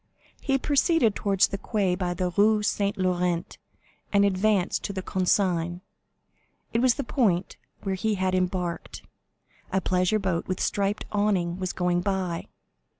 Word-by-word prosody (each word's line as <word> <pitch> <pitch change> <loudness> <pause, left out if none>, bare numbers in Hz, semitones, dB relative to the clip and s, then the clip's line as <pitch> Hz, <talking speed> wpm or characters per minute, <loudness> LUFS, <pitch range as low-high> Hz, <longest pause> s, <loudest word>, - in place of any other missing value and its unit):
He 270 -1 +1
proceeded 285 - +2
towards 195 -2 +2
the 195 - -4
quay 200 -5 0
by 180 -1 -2
the 180 +1 -1
Rue 210 +3 +3
Saint 200 -1 0
Laurent, 180 -2 -1 0.5
and 200 0 +4
advanced 200 -1 +1
to 200 - -3
the 190 -1 -4
Consigne; 180 -2 0 0.9
it 230 - +2
was 250 -2 +4
the 280 - -3
point 200 -9 0 0.3
where 195 - -1
he 210 +3 0
had 185 -1 0
embarked. 180 -2 -2 0.7
A 190 - +2
pleasure 185 +3 +1
boat 190 -5 -2
with 185 - -2
striped 200 +1 -1
awning 190 -4 0
was 185 -1 -2
going 180 -1 0
by. 185 -3 -2
190 Hz, 150 wpm, -26 LUFS, 180-205 Hz, 0.9 s, and